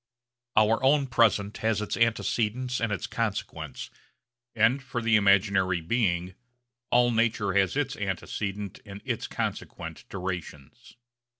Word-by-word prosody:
Our 110 +3 +4
own 140 +1 +4
present 110 -5 +2
has 110 -2 0
its 105 - -2
antecedents 115 +2 0
and 115 -2 0
its 100 - -2
consequents, - - -4 0.6
and 130 +4 +3
for 125 -2 -4
the 115 -1 +3
imaginary 100 -2 +3
being 90 -1 0 0.6
all 120 0 +4
nature 110 -3 +1
has 95 +5 +2
its 145 -1 -1
antecedent 100 0 -4
and 100 -1 -10
its - - -2
consequent - - -5
durations. 90 - -7
105 Hz, 120 wpm, -27 LUFS, 95-115 Hz, 0.6 s, Our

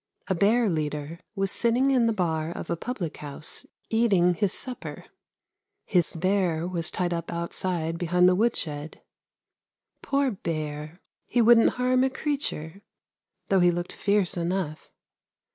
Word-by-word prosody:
A 190 - +1
bear 215 +6 +3
leader 150 -1 -2 0.2
was 195 -1 +1
sitting 245 +4 +2
in 245 -3 +3
the - - +3
bar 165 -6 -1
of 170 - -6
a - - +1
public 185 -4 -5
house 145 +1 -5 0.2
eating 200 -6 +3
his 195 +2 0
supper; 255 -2 -4 0.8
his 180 -5 +1
bear 175 -2 +1
was 175 -2 0
tied 175 -1 -1
up 170 -1 -4
outside 170 -1 -3
behind 180 +1 +3
the 185 - +5
wood 225 +5 +2
shed. 150 -1 -5 1.0
Poor 275 -1 +1
bear! 155 -3 -5 0.3
he 245 - 0
wouldn't 230 0 +6
harm 255 +1 +3
a 265 - +3
creature, 260 - -3 0.7
though 195 - +4
he 175 0 +5
looked 175 0 -2
fierce 200 -2 +1
enough. 170 -3 -3
180 Hz, 145 wpm, -26 LUFS, 165-225 Hz, 1.0 s, wouldn't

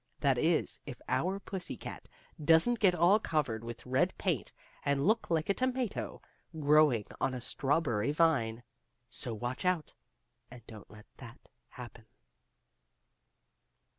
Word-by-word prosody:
That 135 -4 +2
is, 160 +2 +1
if 130 -4 -7
our 190 +3 0
pussy 190 -2 -5
cat - - -9 0.3
doesn't 165 +10 +4
get 185 -4 +4
all 185 +5 +5
covered 135 - -1
with 115 0 -8
red 130 +9 +1
paint, 170 - -1 0.3
and 140 0 +1
look 225 +2 +2
like 160 -2 +1
a 200 - +3
tomato 255 -1 -2 0.4
growing 145 -7 +4 0.2
on 130 - 0
a - - -4
strawberry 135 -2 0
vine. 135 -8 +1 0.5
So 120 -2 -5
watch 120 +4 -4
out, 180 -4 0 0.6
and 120 -2 -13
don't 110 -3 -12
let 105 0 -14
that 120 -1 -11 0.3
happen. 120 -2 -11
145 Hz, 135 wpm, -32 LUFS, 120-175 Hz, 0.6 s, all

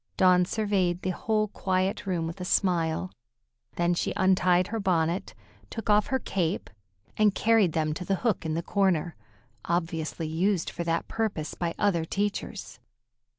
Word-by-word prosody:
Dawn 180 -1 +5
surveyed 190 -3 0
the 185 - 0
whole 215 +3 0
quiet 190 0 -1
room 175 -3 0
with 165 +3 -6
a - - -2
smile, 180 -2 +1 0.6
then 175 0 +2
she 175 - -1
untied 185 -1 +3
her 225 - -2
bonnet, 175 - 0 0.3
took 225 -2 -2
off 210 0 +4
her 265 - +1
cape, 185 -7 -2 0.5
and 210 -2 +4
carried 215 -7 +3
them 155 -1 0
to 170 - -5
the 195 +2 0
hook 220 -6 +1
in 160 -1 -2
the 170 - -2
corner, 180 -4 +1 0.5
obviously 165 -1 -2
used 170 +3 0
for 170 - -4
that 165 0 -1
purpose 210 -9 -2
by 170 -1 -3
other 190 -6 +2
teachers. 200 - -3
180 Hz, 155 wpm, -27 LUFS, 170-200 Hz, 0.6 s, Dawn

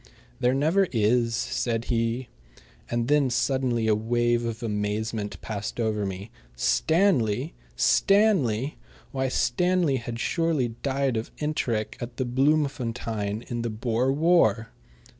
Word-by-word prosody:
"There 125 +1 +2
never 165 +8 +2
is," 115 +1 +2
said 115 -1 -1
he. 115 +2 -1 0.6
And 120 0 -1
then 145 -2 +3
suddenly 125 -2 0
a 110 - +4
wave 120 +2 +1
of 115 +1 -4
amazement 105 0 -2
passed 105 +1 -5
over 105 -3 0
me. 95 +3 -7 0.2
Stanley! 145 - +2 0.2
Stanley! 155 - +2 0.3
Why, 130 0 -1
Stanley 170 +4 +1
had 120 -1 -6
surely 165 -5 0
died 135 -3 0
of 110 - -4
enteric 120 -8 -2
at 120 0 -6
Bloemfontein 120 -5 -1
in 120 -1 -4
the 115 - -2
Boer 115 +3 0
War! 145 -7 +3
120 Hz, 120 wpm, -26 LUFS, 110-140 Hz, 0.6 s, a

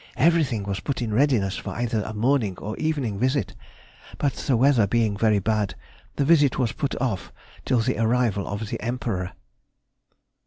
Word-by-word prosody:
Everything 140 -7 +2
was 100 -1 -3
put 140 - -3
in 115 -4 -2
readiness 115 -6 +2
for - - -6
either 120 -2 -1
a 105 - -5
morning 110 -3 +1
or 105 +2 -5
evening 140 -10 -1
visit, 130 -2 0 0.6
but 140 -3 0
the 130 - 0
weather 125 -4 +4
being 110 -1 +1
very 110 0 +3
bad, 105 0 0 0.4
the 140 - +1
visit 145 -4 +4
was 125 -4 +1
put 140 +2 -3
off 110 -7 -2 0.3
till 125 -3 +2
the 125 +2 -1
arrival 115 -3 +1
of 105 +1 -4
the - - -4
Emperor. 110 -6 -3
115 Hz, 165 wpm, -24 LUFS, 105-135 Hz, 0.6 s, weather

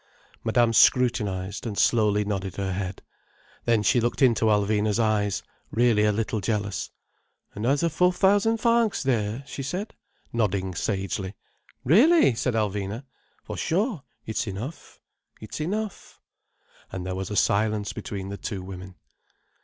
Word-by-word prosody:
Madame 115 0 +3
scrutinized, 105 -5 +2
and 105 -3 -5
slowly 105 -3 +3
nodded 95 -3 -3
her 95 -1 -2
head. 95 0 -4 0.6
Then 115 -3 +3
she 120 - +3
looked 120 +4 0
into 115 -3 +4
Alvina's 105 0 +2
eyes, 105 -3 +1 0.3
really 115 -3 +3
a 105 - +4
little 110 +1 -2
jealous. 105 0 -2 0.6
"Another 135 +10 +1
four 180 +3 +3
thousand 205 +4 +3
francs 230 -4 +2
there," 115 -1 0
she 140 - -6
said, 180 - -4 0.4
nodding 100 -5 0
sagely. 95 +1 -3 0.5
"Really!" 240 - +5
said 125 0 -1
Alvina. 105 +2 -2 0.4
"For - - -6
sure. 195 - 0 0.2
It's 110 +1 -2
enough—it's 110 +2 -9
enough—" 205 +5 -4 0.7
And 90 -1 -5
there 95 - -3
was 95 +1 -4
a 105 - -4
silence 105 0 +1
between 95 -1 -6
the 100 - -5
two 100 -4 -5
women. 95 0 -9
110 Hz, 130 wpm, -25 LUFS, 100-130 Hz, 0.7 s, Really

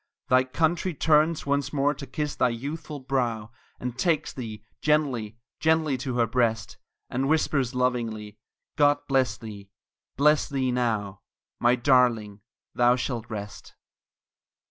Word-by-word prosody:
Thy 130 0 +5
country 165 +5 0
turns 155 +2 +3
once 140 0 0
more 145 0 +1
to 140 -1 -9
kiss 150 +3 -3
thy 125 - +2
youthful 145 +5 -5
brow, 120 -5 -2 0.3
And 125 0 -5
takes 165 -1 +1
thee 110 -4 -7 0.2
gently 130 -8 0 0.2
gently 160 -2 +2
to 130 -1 -3
her 120 -1 +3
breast; 115 -2 0 0.3
And 135 +3 0
whispers 140 -5 +1
lovingly, 115 -4 -2 0.4
"God 145 -1 +3
bless 130 -4 +1
thee 105 -3 -10 0.5
bless 150 +2 +3
thee 130 -3 0
now 110 -5 -1 0.4
My 120 +1 +4
darling, 120 -5 +2 0.3
thou 120 0 +4
shalt 120 -3 -4
rest!" 105 -2 -8
125 Hz, 130 wpm, -26 LUFS, 115-145 Hz, 0.5 s, Thy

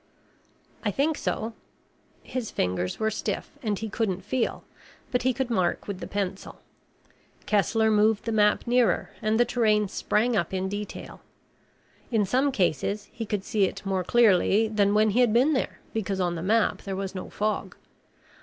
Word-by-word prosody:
"I 215 - +1
think 290 +9 +1
so." 225 -4 -3 0.7
His 250 -4 -4
fingers 90 0 -2
were 220 0 +1
stiff 205 -1 -3
and 210 -5 -1
he 220 - -4
couldn't 195 -3 -2
feel, 245 +2 -1 0.5
but 250 - +1
he 255 - +2
could 250 0 -2
mark 185 -6 0
with 200 -3 -4
the - - -6
pencil. 195 -1 -4 0.9
Kessler 220 +1 +2
moved 215 0 +3
the 230 - -1
map 210 -1 +3
nearer 240 -6 +2
and 215 +1 +1
the 240 - +5
terrain 215 -3 +2
sprang 225 +4 +1
up 190 -1 0
in 190 0 -1
detail. 205 +1 -6 0.9
In 220 -4 +2
some 260 +8 +2
cases, 200 0 -1
he 225 -2 -6
could 200 -2 -2
see 205 -1 +2
it 190 - -5
more 190 -1 0
clearly 215 0 +4
than 205 -1 +2
when 215 0 +4
he 230 - +1
had 240 -4 +4
been 260 +6 +4
there, 260 - -1 0.2
because 200 -3 -2
on 175 -2 +1
the 165 - -4
map 215 +5 +2
there 195 -2 -4
was 195 0 -4
no 185 - -6
fog. 215 +1 -2
210 Hz, 175 wpm, -26 LUFS, 195-230 Hz, 0.9 s, the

